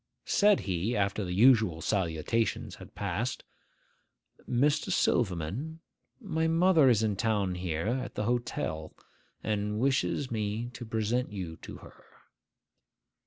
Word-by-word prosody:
Said 205 -1 +4
he, 95 +5 -1
after 100 +1 0
the 90 - -4
usual 110 -4 +4
salutations 95 +4 -1
had - - -13
passed, 100 +6 -2 1.1
'Mr. 145 +9 +2
Silverman, 120 - 0 0.4
my 160 -9 -1
mother 165 -3 +5
is 110 -3 +3
in 105 -2 +1
town 105 -3 0
here, 90 -2 -3
at 125 +4 -2
the - - -1
hotel, 105 -9 -2 0.5
and 105 0 -1
wishes 135 +1 0
me 110 +2 -2
to 120 -1 -8
present 110 +2 -1
you 90 -5 -5
to - - -10
her. - - -16
110 Hz, 120 wpm, -29 LUFS, 95-125 Hz, 1.1 s, mother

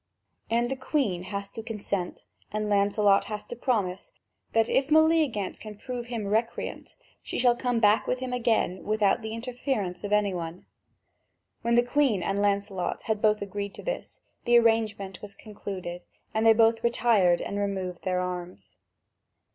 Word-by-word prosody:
And 235 +2 +1
the - - 0
Queen 260 - -1
has 200 +1 -4
to 225 - -7
consent, 205 -5 -4 0.3
and 215 0 -2
Lancelot 200 0 +3
has 210 -1 -5
to - - -7
promise, 210 -7 -1 0.4
that 225 0 +3
if 270 - +2
Meleagant 310 - +3
can 215 -2 -9
prove 245 +2 -6
him 230 -4 -4
recreant, 220 +3 -2 0.3
she - - -4
shall 245 -1 +4
come 245 -1 0
back 210 -1 +4
with 250 - +1
him 255 0 -4
again 230 -7 +1
without 215 +1 +2
the 220 0 -5
interference 230 -6 -3
of 205 - -4
any 210 -2 +2
one. 170 0 -6 1.0
When 235 0 +1
the 240 - +5
Queen 245 -7 +2
and 195 +2 0
Lancelot 200 -2 -1
had 220 -3 -1
both 210 -1 +3
agreed 200 0 -5
to - - -9
this, - - -5 0.2
the 240 -1 +6
arrangement 220 -5 +1
was 200 -1 -9
concluded, 190 -5 -7 0.3
and 220 +1 +2
they 225 - +9
both 225 +1 +3
retired 220 -7 +3
and 200 - -3
removed 190 -3 -3
their 185 -1 0
arms. 180 0 -6
215 Hz, 165 wpm, -27 LUFS, 200-235 Hz, 1.0 s, they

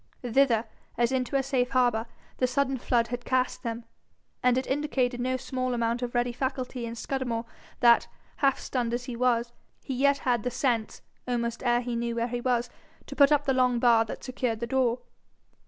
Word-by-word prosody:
Thither, 245 -2 +3 0.3
as 240 +1 +2
into 260 0 -1
a 270 - +3
safe 250 -2 0
harbour, 245 -3 +2 0.3
the 255 - +3
sudden 265 +1 0
flood 235 -1 +1
had 245 0 -4
cast 255 0 0
them; 230 0 -4 0.6
and 250 0 +3
it 260 - 0
indicated 265 -3 0
no 255 +1 0
small 255 -1 -2
amount 235 +1 0
of 245 0 -4
ready 240 0 +1
faculty 255 -1 -3
in 230 - -6
Scudamore 235 -1 -3 0.4
that, 235 -1 +6 0.3
half 275 -2 +3
stunned 240 -2 -2
as 245 - -4
he 245 -1 -6
was, 240 -1 +1 0.3
he 270 - -4
yet 280 +2 +3
had 245 -4 0
the 250 - -1
sense, 240 -3 -1 0.2
almost 235 -1 -2
ere 240 -1 +2
he 245 -1 -3
knew 235 0 -2
where 235 +1 -1
he 240 0 -3
was, 245 -1 +1 0.4
to - - -8
put 280 0 +6
up 290 -1 +3
the 270 - +2
long 250 -1 +3
bar 235 -1 +5
that - - -7
secured 250 -3 -2
the 235 - -2
door. 250 -1 +1
245 Hz, 195 wpm, -27 LUFS, 235-260 Hz, 0.6 s, that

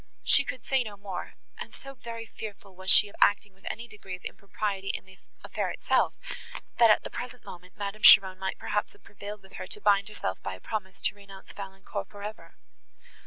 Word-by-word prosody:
She 280 - +6
could 255 -2 -6
say 270 -1 +3
no 210 -3 -8
more; 195 -3 -6 0.2
and - - -7
so 275 0 -10
very 230 -3 -7
fearful 205 -3 -9
was 190 +1 -4
she 210 - +9
of 200 - -14
acting 205 -1 +4
with 190 - -8
any 235 +2 -5
degree 200 -4 -8
of 180 - -16
impropriety 200 0 -3
in - - -3
the 190 0 -17 0.2
affair - - -2
itself, - - +2 0.6
that, 230 -1 +8
at 215 - +5
the - - -6
present 250 0 -6
moment, 180 +1 -11
Madame 205 +1 -4
Cheron 190 -3 +9
might 190 0 -2
perhaps 210 0 -1
have 205 - -23
prevailed 205 0 -8
with 190 - -17
her - - -5
to - - -3
bind 200 -1 +4
herself 155 - -4
by 95 - -4
a - - -13
promise 190 - -4
to - - +2
renounce 200 -1 -13
Valancourt 195 -1 -6
for 205 -1 -10
ever. 215 +1 -11
200 Hz, 210 wpm, -29 LUFS, 190-215 Hz, 0.6 s, she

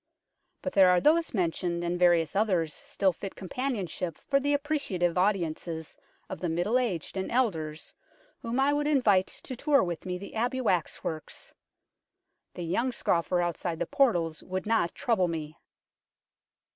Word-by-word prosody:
But 275 - -3
there 190 -2 +7
are 180 0 +5
those 325 - +3
mentioned 175 -3 -1
and 175 +1 -1
various 170 -2 +3
others 185 -7 +1
still 190 -2 +1
fit 195 +3 -7
companionship 190 - -3
for 275 -1 +1
the 285 +1 0
appreciative 280 - -1
audiences 170 -4 -1 0.3
of - - -6
the 175 - -2
middle 175 +9 +1
aged 195 -7 -2
and 190 - -3
elders 160 -11 -1 0.5
whom 235 +2 -2
I 280 +2 +3
would 295 0 0
invite 215 -11 +3
to 255 - -8
tour 285 +2 +3
with 175 0 -4
me 180 0 -2
the 200 +2 -9
Abbey 245 +4 -1
wax 185 -9 0
works. 155 -1 -6 1.0
The 175 - -5
young 235 +10 0
scoffer 175 -5 +1
outside 175 -1 -2
the - - -1
portals 180 - +1
would 185 0 -4
not 215 -6 +1
trouble 215 -7 +1
me. 155 -2 -5
185 Hz, 155 wpm, -28 LUFS, 170-245 Hz, 1.0 s, there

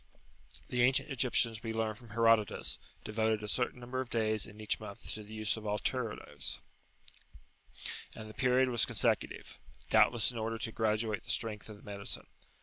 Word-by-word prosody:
The 125 - +1
ancient 130 +4 +4
Egyptians 120 -4 +2
we 115 -1 -3
learn 110 -1 0
from 115 +1 -14
Herodotus 115 -1 +3 0.2
devoted 110 0 +1
a - - -3
certain 125 +3 0
number 125 +1 -2
of 130 - -6
days 110 -3 +1
in 105 -1 -12
each 110 - -1
month - - -8
to 110 - -5
the 105 0 -12
use 110 +1 0
of 110 - -7
alteratives, 105 +2 -1 1.6
and 110 - -7
the 110 - -9
[p.56]period 130 +1 +3
was 120 -2 +3
consecutive, - - 0 0.3
doubtless 120 -1 +5
in 120 - -5
order 115 +1 -1
to 115 - -2
graduate 110 -1 +1
the - - -15
strength 110 -2 -2
of 105 - -8
the - - -18
medicine. 100 -1 -4
110 Hz, 170 wpm, -33 LUFS, 110-120 Hz, 1.6 s, doubtless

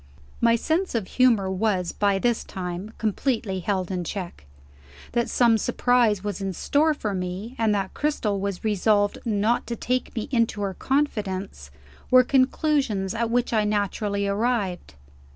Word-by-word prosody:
My 230 0 +5
sense 325 - -1
of 220 -4 0
humor 230 -7 +3
was, 190 -2 0
by 200 -1 +1
this 235 +3 0
time, 180 +2 -6
completely 220 -2 -1
held 185 0 -2
in 180 -1 -2
check. 175 - -6 0.6
That 235 0 0
some 230 -3 +4
surprise 240 -4 +2
was 205 -1 -4
in 195 -1 -2
store 300 - +2
for 210 -7 -3
me, 185 +5 -4
and 220 -2 +2
that 195 -1 -2
Cristel 230 -9 -1
was 200 -2 -3
resolved 205 -1 +2
not 220 +1 +1
to 235 - -3
take 250 +2 -2
me 225 - -3
into 230 -4 +1
her 195 -1 -2
confidence, 200 - -2 0.4
were 255 0 +7
conclusions 260 -6 +1
at 230 0 -1
which 245 +1 0
I 215 -2 +3
naturally 205 -1 -1
arrived. 200 - -1
210 Hz, 150 wpm, -24 LUFS, 195-240 Hz, 0.6 s, were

